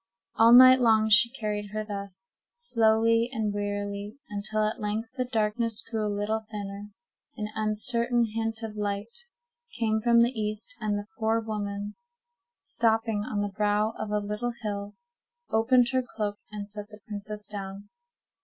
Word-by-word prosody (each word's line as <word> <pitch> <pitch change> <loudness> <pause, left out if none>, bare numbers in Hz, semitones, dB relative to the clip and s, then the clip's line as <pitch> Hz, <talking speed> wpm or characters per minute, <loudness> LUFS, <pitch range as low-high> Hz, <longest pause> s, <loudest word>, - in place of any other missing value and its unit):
All 225 +1 +6
night 255 +1 +10
long 220 -2 +4
she 210 +3 +7
carried 210 -5 -3
her 215 0 -2
thus, 200 -2 -6 0.2
slowly 230 - +3
and 220 -4 -1
wearily, 205 +2 -3
until 215 +1 0
at 215 +3 -1
length 215 +2 -2
the 255 -2 -1
darkness 225 -1 0
grew 220 -2 -3
a 210 - 0
little 205 +2 -1
thinner, 205 -1 -6 0.5
an 210 0 -3
uncertain 235 +3 +1
hint 225 0 -2
of 220 -1 -5
light 205 +2 -3 0.6
came 220 -1 +1
from 235 0 +5
the 235 +1 +4
east, 215 -3 -4
and 210 -2 0
the 205 - -5
poor 225 0 +2
woman, 205 -2 -4 0.7
stopping 225 -2 +1
on 205 -2 -2
the 205 -1 -3
brow 210 +1 +1
of 215 - -5
a 210 - +1
little 210 +4 -2
hill, 205 -1 -4 0.6
opened 240 +2 +4
her 260 -1 +2
cloak, 210 -4 -4
and 205 -1 -6
set 210 0 -8
the 210 -1 -13
princess 210 0 -6
down. 200 -1 -7
215 Hz, 155 wpm, -28 LUFS, 205-225 Hz, 0.7 s, night